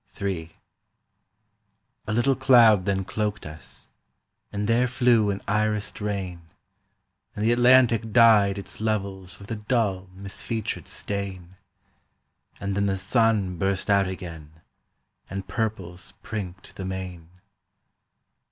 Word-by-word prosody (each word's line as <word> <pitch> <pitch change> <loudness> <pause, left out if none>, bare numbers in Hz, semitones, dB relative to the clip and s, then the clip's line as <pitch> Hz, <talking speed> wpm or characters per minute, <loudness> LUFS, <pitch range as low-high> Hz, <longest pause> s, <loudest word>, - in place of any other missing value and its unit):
III 85 -5 -3 1.6
A - - -2
little 120 +4 +2
cloud 120 -7 +6
then 95 -1 0
cloaked 105 +2 -3
us, 75 0 -10 0.6
and 105 0 -2
there 120 +2 +3
flew 120 -4 +3
an 100 0 -2
irised 105 0 -1
rain, 95 -4 -3 0.9
And 105 - -2
the 115 - +4
Atlantic 120 -2 +4
dyed 105 -4 +6
its 100 +1 -8
levels 100 -4 -3
with 100 +3 -11
a - - -1
dull 105 -4 -1
misfeatured 100 +3 -5
stain, 95 -3 -5 1.0
And 100 -1 -3
then 100 0 +1
the 95 -1 0
sun 100 -3 +1
burst 95 +1 0
out 100 -1 +4
again, 80 -4 -8 0.7
and 95 0 -5
purples 100 -4 -4
prinked 95 -4 -7
the 95 - -5
main. 90 -3 -6
100 Hz, 115 wpm, -25 LUFS, 95-110 Hz, 1.6 s, cloud